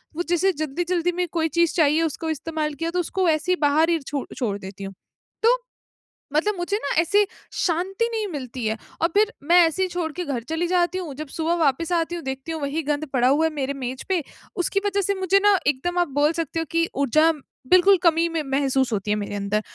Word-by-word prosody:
वो 345 - -1
जिसे 355 +2 +3
जल्दी-जल्दी 345 +4 -1
में 360 0 0
कोई 325 -2 +1
चीज़ 340 -1 +3
चाहिए 310 -1 +3
उसको 325 +1 -2
इस्तेमाल 310 0 -2
किया, 330 +3 -3
तो 360 - -1
उसको 370 +2 -1
वैसे 315 +1 +1
ही 365 - +4
बाहर 305 +3 +3
ही 335 -1 +2
छो 280 -2 -3
छोड़ 215 -6 -2
देती 195 +1 -9
हूँ। 195 0 -6 0.5
तो 475 +2 +5 0.8
मतलब 415 +6 +2
मुझे 355 +4 -1
ना 280 -8 -3
ऐसे 405 +5 +3 0.3
शांति 380 +6 0
नहीं 440 -2 -2
मिलती 255 - -5
है, 220 0 -1 0.2
और 330 - +4
फिर 425 +2 +3
मैं 350 +1 +7
ऐसे 325 +3 -1
ही 370 - +1
छोड़ 350 -2 -3
के 355 0 -4
घर 255 -6 -3
चली 330 +2 0
जाती 360 0 +1
हूँ, 340 -7 -5
जब 305 +1 -6
सुबह 325 +4 -1
वापस 305 +5 +1
आती 330 +1 -2
हूँ, 340 - -6
देखती 265 +4 -5
हूँ 320 -1 -4
वही 285 +3 -2
गंद 295 +1 -1
पड़ा 250 -1 +3
हुआ 295 +4 +3
है 320 - +1
मेरे 280 -1 -2
मेज 260 -1 -5
पे 355 -5 +1 0.3
उसकी 370 +2 0
वजह 400 0 +1
से 400 +1 0
मुझे 380 +1 +3
ना 410 -1 +5
एकदम 295 +6 0
आप 350 - +2
बोल 295 +2 +4
सकते 325 +1 -4
हो 325 - -2
कि 335 0 +2
ऊर्जा 305 +4 +4 0.4
बिल्कुल 375 +2 +7
कमी 335 0 +4
में 325 -1 -1
महसूस 270 -2 +1
होती 205 0 -1
है - - +3
मेरे 205 0 -4
अंदर। 200 +1 -1
325 Hz, 230 wpm, -23 LUFS, 280-355 Hz, 0.8 s, मैं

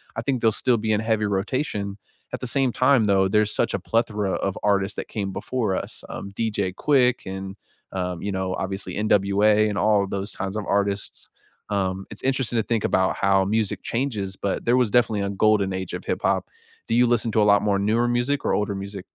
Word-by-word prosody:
I 115 - -2
think 130 +1 -1
they'll 110 -2 +3
still 125 -2 +2
be 110 0 0
in 105 - +1
heavy 110 -1 +1
rotation, 100 0 -2 0.3
at - - -4
the 125 - -5
same 135 +1 +1
time, 130 -3 +3
though, 95 -1 +3
there's 105 +2 +2
such - - +1
a - - -1
plethora 105 -4 0
of 95 0 -2
artists 100 -1 +1
that - - -6
came 100 -3 -3
before 110 -5 -1
us, - - -5
um, 100 - -7
DJ 100 -3 -1
Quick 125 +4 +2
and, 95 0 -6 0.3
um, 90 -2 -3
you 100 - -3
know, 95 -1 -2
obviously 95 +1 -4
NWA 105 +1 +3
and 105 -1 -2
all 105 0 +3
of 100 - -6
those 100 +1 -3
kinds 95 +1 -4
of 110 -1 -3
artists, 100 0 -1 0.4
um, 95 -1 -1
it's - - -7
interesting 130 -2 0
to 110 - +2
think 115 -1 -1
about 95 0 +1
how 95 -1 +3
music 105 +1 -1
changes, 110 -7 -2
but 100 - -2
there 120 +2 +3
was 125 -4 +2
definitely 115 -4 +2
a 100 - -1
golden 100 -1 +2
age 95 -1 -4
of - - -6
hip-hop. - - 0 0.4
Do - - -1
you 120 +1 +4
listen 115 -1 +1
to 110 - +2
a - - +5
lot 100 0 +4
more 100 -2 +1
newer 110 +4 +2
music 120 +4 0
or - - +1
older 105 -1 0
music? 100 -1 -6
105 Hz, 215 wpm, -24 LUFS, 100-115 Hz, 0.4 s, a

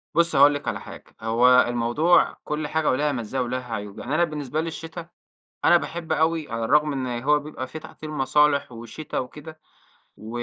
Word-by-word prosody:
بُصّي 170 -2 +3
هاقول 145 +1 +7
لِك 145 - -5
على - - -2
حاجة. - - -11 0.2
هو 115 +3 +3 0.2
الموضوع 120 +9 +2
كل 150 0 -3
حاجة 160 0 0
وليها 145 +3 +1
مزاية 130 0 -3
وليها 125 -1 -4
عيوب. 105 -1 -6
يعني 145 - -3
أنا 170 - +3
بالنسبة 150 -2 -2
لي 165 - -4
الشتا، 165 +1 -7 0.6
أنا 175 - +7
باحب 165 -1 -3
أوي 160 -1 0
على 115 0 -2
الرغم 150 +5 +3
إن 125 -3 -3
هو 150 +2 +3
بيبقى 145 -3 -7
في 130 +5 -8
تعطيل 155 0 -10
مصالح 145 -1 +2
وشتا 120 +6 -6
وكده 150 +5 -8 0.6
و 110 - -10
145 Hz, 185 wpm, -24 LUFS, 125-155 Hz, 0.6 s, هاقول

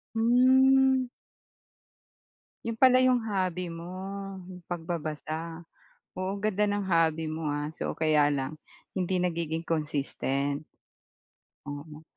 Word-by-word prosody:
Hmm. 260 +2 +5 1.6
'Yon 230 -1 -3
pala 255 -1 +6
'yong 255 -1 +4
hobby 185 -3 -1
mo, 170 +1 -7 0.6
'yong 180 -1 -10
pagbabasa. 165 0 -4 0.5
Oo, 185 +2 -3
ganda 210 0 +1
ng 205 -1 0
hobby 165 -3 +2
mo 155 0 -3
ha. 145 +1 -2
So, - - -3
kaya 155 -2 +4
lang 140 0 -1 0.4
hindi 185 -1 -1
nagiging 165 -2 -1
consistent. 145 -2 -1 1.0
Oo. 150 +2 -8
170 Hz, 105 wpm, -28 LUFS, 155-205 Hz, 1.6 s, pala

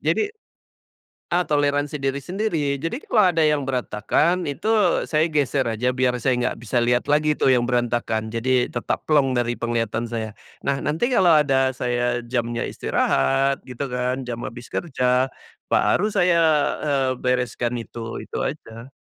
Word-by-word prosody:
jadi, - - +1 1.1
eee, 180 0 +2
toleransi 145 0 +1
diri 135 +1 -1
sendiri. 165 -6 -1
Jadi 165 +10 -2
kalau 215 -3 +4
ada 165 - 0
yang 150 -2 +2
berantakan, 135 - 0
itu 145 +10 -3 0.4
saya 155 +1 +2
geser 140 -2 +1
aja 115 +3 0
biar 125 -1 +2
saya 130 0 +2
nggak 125 - -1
bisa 120 +2 -1
lihat 120 +1 +1
lagi 150 0 +3
itu - - +3
yang 125 -2 +3
berantakan, 120 -3 -1
jadi 125 +2 +1
tetap 120 - -3
plong 145 -4 +3
dari 120 0 0
penglihatan 115 -1 -1
saya. 110 -2 -4 0.3
Nah, 140 -1 +1
nanti 155 +11 0
kalau 185 -8 +4
ada 135 -2 +2
saya 120 0 -1
jamnya 120 -1 -2
istirahat 135 - +1
gitu 125 +2 -5
kan, 125 +1 -1
jam 120 -1 -4
habis 120 +3 -9
kerja 130 -4 0 0.4
baru 210 - +2
saya, 175 -1 +3 0.4
eee, 135 -3 +1
bereskan 125 -1 -1
itu, 115 0 -7
itu - - -8
aja. 125 -3 -7
130 Hz, 150 wpm, -22 LUFS, 120-150 Hz, 1.1 s, kalau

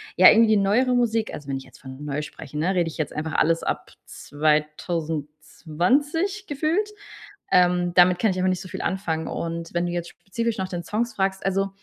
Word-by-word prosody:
ja, - - +9
irgendwie 220 -1 +5
neuere 230 +6 +2
Musik, 230 -2 +1
also 145 - -8
wenn 135 -1 -2
ich 135 - -8
jetzt - - -18
von 130 +2 -10
neu 145 0 -2
spreche, 150 0 -9
ne, 170 +5 +1
rede 175 -3 +1
ich - - -10
jetzt 155 -2 -3
einfach 155 +1 -4
alles 165 +1 +2
ab - - -3
2020 160 - -1
gefühlt. 315 +9 0 0.6
Ähm, 180 -1 +3
damit 180 0 +6
kann 220 - +2
ich 185 - -4
einfach 185 0 +1
nicht 185 -1 -1
so - - -9
viel - - -6
anfangen. 165 -4 -2
Und 165 0 -4
wenn 175 0 0
du 175 - -2
jetzt 175 -1 -3
spezifisch 230 +3 -4
nach 190 - -2
den 175 -2 -5
Songs 230 +6 -2
fragst 190 0 -1
also, 195 0 +1
180 Hz, 200 wpm, -24 LUFS, 155-215 Hz, 0.6 s, ja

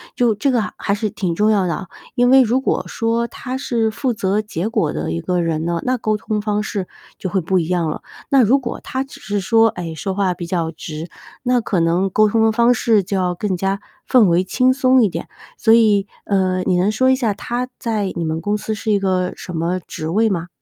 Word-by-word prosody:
就 235 -3 +2
这 275 +4 +1
个 240 - +2
还 - - -5
还 200 - -1
是 210 +1 -1
挺 185 -5 -2
重 210 +3 +2
要 195 -3 +2
的 170 - 0
啊， 190 - -7 0.3
因 245 0 +3
为 265 0 +7
如 245 +3 +1
果 270 - 0
说， 230 +1 0
他 255 +2 -6
是 230 -4 0
负 250 +3 -1
责 200 0 0
结 210 -2 -3
果 225 -1 0
的 75 +2 -3
一 85 0 -2
个 180 -1 -1
人 160 -2 -1
呢， 170 -1 -1
那 255 0 0
沟 215 -2 0
通 210 0 -2
方 210 0 -1
式 200 -3 -4 0.3
就 185 - -4
会 190 - +1
不 185 +2 0
一 165 - -2
样 175 -3 +1
了。 155 - -5 0.3
那 270 -3 +5
如 260 +6 +4
果 235 -2 -5
他 260 +1 -2
只 275 - -14
是 205 0 -2
说， 225 +4 +4
哎， 170 -5 -6
说 190 +5 -3
话 190 -2 +1
比 175 -1 -6
较 170 -2 -1
直， 155 +1 -7 0.3
那 250 -1 +2
可 195 -5 -1
能 175 +4 +2
沟 215 +3 +4
通 220 +2 +2
的 220 - +4
方 235 +2 +4
式 220 -3 +3
就 195 +2 -3
要 180 -1 0
更 195 0 -1
加 195 +2 -1 0.3
氛 250 -4 +5
围 175 0 +3
轻 255 +7 +2
松 255 -1 +4
一 215 - +4
点。 - - -5 0.3
所 225 -1 +4
以， 210 -4 +4 0.2
呃， 185 -2 +1
你 180 - +1
能 185 +4 +2
说 260 +4 +2
一 260 - +4
下 230 -6 0
他 240 +5 -3
在 215 -6 -1
你 170 - -2
们 160 0 -2
公 205 +4 0
司 220 +1 -4
是 220 0 -2
一 205 - +3
个 185 -2 0
什 180 - -8
么 170 +3 -1
职 155 -2 -7
位 220 +5 +2
吗？ 175 -3 -2
205 Hz, 265 characters per minute, -19 LUFS, 180-230 Hz, 0.3 s, 为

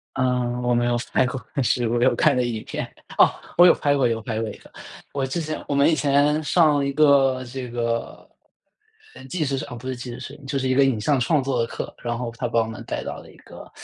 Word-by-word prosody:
嗯， 125 -1 0
我 120 0 +1
没 120 0 +2
有 120 0 +1 0.2
拍 - - +3
过， 125 +1 -4
但 140 - 0
是 120 -1 +1
我 120 +1 0
有 130 - +4
看 145 -3 +3
过 125 - +2
影 115 -3 -3
片。 - - -4 0.3
哦！ - - +7 0.3
我 175 - +8
有 175 - +7
拍 145 -1 +1
过， 135 -3 +2
有 115 -1 -1
拍 110 -1 -3
过 115 - -2
一 - - -9
个。 - - -18 0.4
我 140 -1 -1
之 130 +6 -2
前 155 -1 -4
我 145 - -1
们 140 0 +4
以 - - +3
前 145 +1 +2
上 150 -3 +3
一 140 - -1
个 135 -4 +4
这 130 0 -6
个， 115 -1 -3 0.9
呃 - - -12
纪 155 +4 -2
实 135 -2 -2
哦 125 -4 -8
不 120 +2 -10
是 130 - -2
纪 125 0 -7
实 120 - -7
摄 135 - -8
影， 145 - -16
就 135 +1 -2
是 130 -1 -1
一 130 - +2
个 140 +1 +5
影 130 -5 +1
像 140 +4 +1
创 150 +3 +2
作 130 -2 -1
的 115 - +1
课， - - -6
然 120 -1 -2
后 120 -1 -4
他 - - -2
把 - - 0
我 - - +1
们 110 0 -7
带 - - -4
到 - - -5
了 - - -13
一 - - -18
个， - - -13
130 Hz, 290 characters per minute, -23 LUFS, 120-140 Hz, 0.9 s, 我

